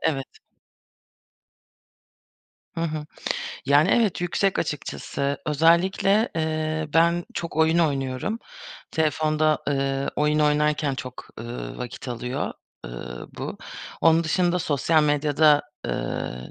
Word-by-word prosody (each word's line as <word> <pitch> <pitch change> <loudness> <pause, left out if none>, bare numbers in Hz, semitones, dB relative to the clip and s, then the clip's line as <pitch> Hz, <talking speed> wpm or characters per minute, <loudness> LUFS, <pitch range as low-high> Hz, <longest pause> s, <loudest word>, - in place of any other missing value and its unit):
Evet. 140 -4 0 2.5
Hı 165 - -3
hı. 155 -2 -2 0.6
Yani, 145 +2 +5
evet, 220 -8 +2
yüksek, 185 +2 +1
açıkçası. 140 -1 -2
Özellikle, 180 - +3
eee, 155 0 -1
ben 170 +1 +4
çok 170 -2 -4
oyun 160 +1 +4
oynuyorum. 140 - 0 0.5
Telefonda, 155 -1 +2
ııı, 135 -1 0
oyun 150 0 +2
oynarken 150 -1 +2
çok, 125 -1 -8
ııı, 120 +1 -6
vakit 125 +1 -6
alıyor, 125 +2 -3 0.3
ııı, 60 +1 -7
bu. - - -5 0.4
Onun 165 0 +5
dışında 180 +2 +2
sosyal 155 +1 +2
medyada, 150 0 +4 0.2
ııı, 60 0 -4
150 Hz, 100 wpm, -24 LUFS, 140-165 Hz, 2.5 s, Yani